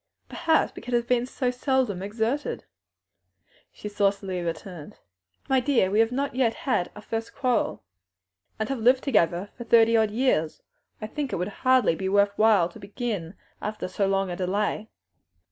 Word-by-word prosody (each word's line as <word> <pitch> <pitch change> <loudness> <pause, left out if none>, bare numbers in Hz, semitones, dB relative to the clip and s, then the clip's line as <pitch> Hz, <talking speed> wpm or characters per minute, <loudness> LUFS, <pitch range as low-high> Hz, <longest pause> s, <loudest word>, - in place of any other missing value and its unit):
"Perhaps 320 -2 +1
because 245 0 -4
it 235 0 0
has 250 0 +1
so 255 -2 -1
seldom 250 -6 0
been 190 - -5
exerted," 230 +7 -2 1.1
she - - -8
saucily 200 -2 -1
returned. 170 -1 -6 0.5
"My 265 -1 +3
dear, 250 -8 +2
we 210 - +2
have 225 +1 +3
not 275 +2 -2
yet 245 -3 +1
had 270 - -1
our 210 - -10
first 225 +1 -5
quarrel." 250 -4 0 0.7
"And 215 - -2
have 270 -2 -2
lived 250 +3 +4
together 200 - +1
for 240 - -7
thirty 230 0 +5
odd 220 -1 +3
years. 210 -9 0 0.4
I - - -5
think 280 +5 -4
it - - -1
would 180 +3 -2
hardly 255 -7 +4
be 190 +3 -3
worth 200 +1 +3
while 215 -6 +4
to - - -13
begin 200 -4 -4 0.3
after 215 -2 -4
so 195 +2 -1
long 195 -1 0
a - - -3
delay." 205 +4 -1
220 Hz, 170 wpm, -26 LUFS, 195-250 Hz, 1.1 s, thirty